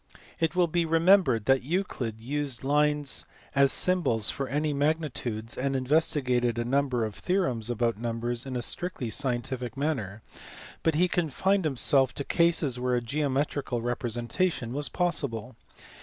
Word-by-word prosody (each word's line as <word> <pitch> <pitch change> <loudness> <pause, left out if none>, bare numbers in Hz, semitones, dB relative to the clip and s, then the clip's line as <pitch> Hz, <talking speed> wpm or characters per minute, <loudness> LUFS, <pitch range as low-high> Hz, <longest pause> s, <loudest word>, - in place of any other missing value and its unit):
It 165 +1 0
will 180 -1 +4
be 170 +1 0
remembered 165 - +4
that 135 0 +4
Euclid 130 - -3
used 135 +1 -3
lines 150 0 +1 0.3
as 140 -1 +5
symbols 170 - +2
for 135 - -4
any 150 +2 -1
magnitudes, 140 -7 -2
and 135 +1 -1
investigated 130 -3 +1
a 120 - -1
number 130 -2 +1
of 110 - -5
theorems 130 - -1
about 115 -2 0
numbers 120 +2 -1
in 130 - -5
a 120 - -1
strictly 150 -9 -3
scientific 125 0 -1
manner, 115 -9 -2 0.6
but 160 -2 +1
he 180 +4 +3
confined 180 +2 +1
him 135 -4 -4
self 135 -1 +2
to 140 - -3
cases 160 -6 +2
where 125 0 0
a 120 - 0
geometrical 140 0 -1
representation 120 - -1
was 145 +1 -1
possible. 130 - -1
135 Hz, 145 wpm, -27 LUFS, 120-155 Hz, 0.6 s, as